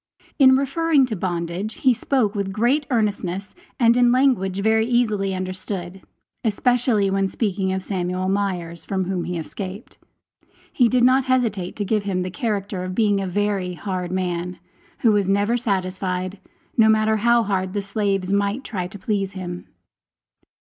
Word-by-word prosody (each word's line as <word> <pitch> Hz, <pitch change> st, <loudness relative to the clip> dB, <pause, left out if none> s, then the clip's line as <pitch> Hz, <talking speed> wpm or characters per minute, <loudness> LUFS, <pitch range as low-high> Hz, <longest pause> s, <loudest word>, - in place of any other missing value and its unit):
In 260 Hz, -1 st, +7 dB
referring 280 Hz, +1 st, +2 dB
to 235 Hz, -4 st, -4 dB
bondage, 175 Hz, +3 st, -3 dB
he 260 Hz, -2 st, +3 dB
spoke 235 Hz, -3 st, 0 dB
with 200 Hz, -2 st, -2 dB
great 245 Hz, +8 st, +1 dB
earnestness, 205 Hz, -5 st, -1 dB, 0.3 s
and 235 Hz, -1 st, +5 dB
in 245 Hz, -1 st, +4 dB
language 245 Hz, -8 st, +2 dB
very 220 Hz, +1 st, +2 dB
easily 215 Hz, -6 st, +1 dB
understood; 185 Hz, 0 st, -5 dB, 0.4 s
especially 230 Hz, -2 st, +2 dB
when 195 Hz, 0 st, +1 dB
speaking 195 Hz, -2 st, -1 dB
of 190 Hz, 0 st, -2 dB
Samuel 185 Hz, -1 st, -2 dB
Myers, 185 Hz, -4 st, -2 dB
from 190 Hz, -1 st, -1 dB
whom 185 Hz, -1 st, -2 dB
he 180 Hz, -1 st, -3 dB
escaped, 190 Hz, +5 st, -7 dB, 0.7 s
he 245 Hz, -3 st, +4 dB
did 250 Hz, 0 st, +2 dB
not 255 Hz, +1 st, +4 dB
hesitate 230 Hz, -8 st, 0 dB
to 205 Hz, -, -3 dB
give 215 Hz, +1 st, +1 dB
him 190 Hz, -2 st, -2 dB
the 185 Hz, -, -4 dB
character 200 Hz, -2 st, -2 dB
of 185 Hz, 0 st, -5 dB
being 205 Hz, -3 st, +2 dB
a 195 Hz, -, -2 dB
very 195 Hz, -1 st, -1 dB
hard 180 Hz, -1 st, -4 dB
man, 180 Hz, -1 st, -2 dB, 0.4 s
who 230 Hz, -, +5 dB
was 205 Hz, -2 st, +2 dB
never 205 Hz, +4 st, +2 dB
satisfied, 185 Hz, -4 st, -2 dB, 0.4 s
no 220 Hz, -1 st, +5 dB
matter 220 Hz, 0 st, +3 dB
how 235 Hz, +2 st, +3 dB
hard 190 Hz, -2 st, -1 dB
the 205 Hz, -1 st, -2 dB
slaves 195 Hz, -2 st, -1 dB
might 200 Hz, +5 st, 0 dB
try 185 Hz, -8 st, -4 dB
to 195 Hz, -, -10 dB
please 195 Hz, -1 st, -2 dB
him. 180 Hz, -2 st, -6 dB
200 Hz, 160 wpm, -22 LUFS, 185-225 Hz, 0.7 s, In